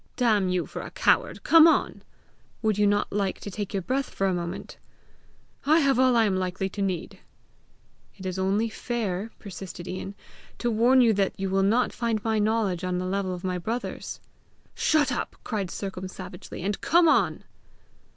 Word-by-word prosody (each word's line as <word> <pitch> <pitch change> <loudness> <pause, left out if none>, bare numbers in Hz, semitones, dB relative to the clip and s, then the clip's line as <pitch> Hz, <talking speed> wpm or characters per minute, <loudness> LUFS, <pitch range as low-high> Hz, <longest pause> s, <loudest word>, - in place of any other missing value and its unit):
"Damn 215 -7 +2
you 180 -1 0
for - - -7
a - - -7
coward, - - +1
come 330 0 +8
on!" 325 - +1 0.6
"Would 215 -2 +1
you 205 - +4
not 205 0 +1
like 200 -2 -1
to 205 - -6
take 205 0 -4
your 195 -2 -2
breath 265 +6 -1
for 195 - -2
a 190 - +2
moment?" 175 +1 -5 0.9
"I 310 +3 +4
have 275 -3 +3
all 255 -1 +4
I 230 -1 +5
am 195 -3 +1
likely 185 +1 -2
to 200 - -6
need." 185 -4 -3 1.0
"It 190 - -10
is 185 0 -3
only 200 +4 +1
fair," 220 -3 -3
persisted 185 -3 -8
Ian, 190 +2 -5 0.4
"to 240 - -1
warn 240 +4 +5
you 230 -2 +5
that 195 -1 0
you 195 -1 -2
will 195 0 +2
not 225 +6 +2
find 230 -3 -1
my 220 -1 +1
knowledge 210 -4 0
on 180 -1 -1
the 180 - -2
level 190 0 -1
of 180 - -10
my 180 -1 -1
brother's!" 230 +7 -4 0.5
"Shut 300 -4 +2
up," 245 - -3
said 205 -5 -2
Sercombe 190 0 -5
savagely, 180 -2 -9
"and 200 +1 -2
come 340 +1 +4
on." - - +2
200 Hz, 185 wpm, -26 LUFS, 185-230 Hz, 1.0 s, come